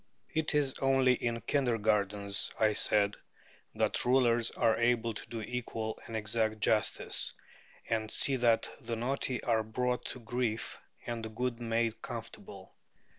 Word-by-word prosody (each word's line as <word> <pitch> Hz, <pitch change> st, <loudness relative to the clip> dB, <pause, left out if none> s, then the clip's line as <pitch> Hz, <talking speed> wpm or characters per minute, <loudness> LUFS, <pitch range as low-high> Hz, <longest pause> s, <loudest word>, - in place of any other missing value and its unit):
It 160 Hz, -1 st, 0 dB
is 140 Hz, -3 st, +1 dB
only 135 Hz, -1 st, +4 dB
in 115 Hz, -1 st, -2 dB
kindergartens, 105 Hz, -6 st, +1 dB
I 110 Hz, -1 st, +4 dB
said, 105 Hz, -1 st, +3 dB, 0.6 s
that -, -, +1 dB
rulers 120 Hz, -2 st, +3 dB
are 115 Hz, -1 st, +2 dB
able 115 Hz, -1 st, +1 dB
to 105 Hz, -, -8 dB
do 115 Hz, -1 st, -4 dB
equal 115 Hz, -2 st, -4 dB
and 115 Hz, -, -6 dB
exact 110 Hz, 0 st, 0 dB
justice, 105 Hz, +1 st, +1 dB, 0.6 s
and 110 Hz, -1 st, -1 dB
see 135 Hz, +4 st, +3 dB
that 120 Hz, -2 st, +3 dB
the 115 Hz, 0 st, -4 dB
naughty 125 Hz, +1 st, -2 dB
are 115 Hz, -2 st, +2 dB
brought 125 Hz, +3 st, -2 dB
to -, -, -5 dB
grief 115 Hz, -1 st, -2 dB, 0.3 s
and 120 Hz, -1 st, -4 dB
the 110 Hz, -, -4 dB
good 120 Hz, +2 st, -2 dB
made 115 Hz, -1 st, -1 dB
comfortable. -, -, -8 dB
115 Hz, 140 wpm, -32 LUFS, 110-125 Hz, 0.6 s, only